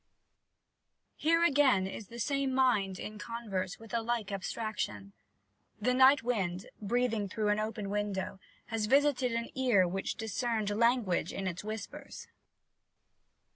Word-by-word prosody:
Here 330 +2 +3
again 270 - +4
is 195 +2 -6
the 235 - -10
same 275 +1 0
mind 210 -8 +2
in 210 +2 -7
converse 205 -6 -4
with 225 0 -13
a 230 - +1
like 225 -3 -2
abstraction. 190 - -4 0.7
"The 250 +4 +2
Night 260 0 +6
Wind," 190 -7 -1 0.2
breathing 225 -1 0
through 210 +2 -1
an 210 0 +2
open 215 -1 -3
window, 195 -2 -2 0.3
has 215 -1 0
visited 270 -1 +3
an 230 0 -2
ear 240 -9 +3
which 190 +2 -2
discerned 225 -1 -1
language 220 -6 +2
in 195 - -4
its 185 0 -3
whispers. 215 0 -7
220 Hz, 135 wpm, -31 LUFS, 195-245 Hz, 0.7 s, Night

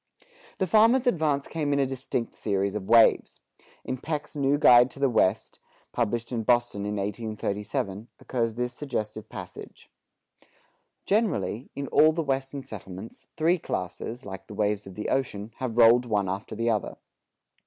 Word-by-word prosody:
The 190 - +1
farmer's 225 +7 +4
advance 155 - +1
came 150 -3 -2
in 140 - +2
a 140 - +3
distinct 130 -2 -3
series 100 -1 -1
of 105 -1 -5
waves. 115 0 +4 0.4
In 130 - -4
Peck's 150 +1 -4
New 140 0 +2
Guide 125 -3 +7
to 135 - -11
the 140 -2 +2
West, 110 -1 +1 0.3
published 120 0 -2
in 120 -2 -1
Boston 120 -3 +1
in 105 - -2
1837, 105 0 -3
occurs 115 -3 -2
this 125 0 -2
suggestive 110 -7 -5
passage: - - -10 1.1
Generally, 135 - 0
in 140 - -3
all 155 +1 +5
the 165 0 -1
western 135 0 -2
settlements, 100 -4 -10
three 170 +3 +2
classes, 115 - -5
like 95 0 -8
the 105 - -9
waves 105 -1 -1
of 95 - -10
the 105 - -4
ocean, 115 -5 -2
have 120 -3 -4
rolled 120 +1 +6
one 105 -3 0
after 95 +4 -4
the 115 +1 +1
other. 105 -3 -2
120 Hz, 155 wpm, -26 LUFS, 105-140 Hz, 1.1 s, Guide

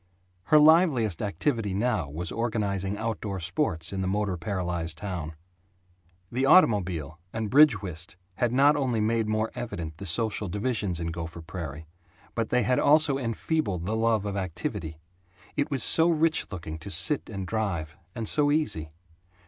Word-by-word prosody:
Her 155 - +5
liveliest 150 - +4
activity 105 - -1
now 105 - 0
was 80 +4 -4
organizing 105 -4 -1
outdoor 110 -3 -3
sports 90 - -1
in 95 - -2
the 95 - -1
motor 100 -1 0
paralyzed 85 -2 -2
town. 90 -6 -5 1.0
The 130 +3 -1
automobile 95 - +3
and 110 -2 -3
bridge 135 -8 +6
whist 85 -2 -5 0.2
had 120 -2 +1
not 140 +4 +5
only 130 -6 0
made 110 +1 +1
more 110 +1 0
evident 80 -9 -5
the 100 - -7
social 105 +3 0
divisions 105 -3 -1
in 85 -1 -2
Gopher 80 0 -6
Prairie 80 -3 -7 0.5
but 115 -1 -2
they 125 -1 +2
had 125 +4 +2
also 150 -2 +4
enfeebled 115 - -1
the 110 +4 -1
love 110 -2 +1
of 100 -1 -3
activity. 80 -4 -4 0.6
It 145 - 0
was 135 -4 -1
so 165 +1 +4
rich 160 -1 +2
looking 80 -4 -6
to 80 - -8
sit 150 +8 0
and 100 -3 -5
drive 90 -7 -2 0.2
and 115 -2 -4
so 145 +4 +2
easy. 80 - 0
105 Hz, 155 wpm, -27 LUFS, 85-125 Hz, 1.0 s, bridge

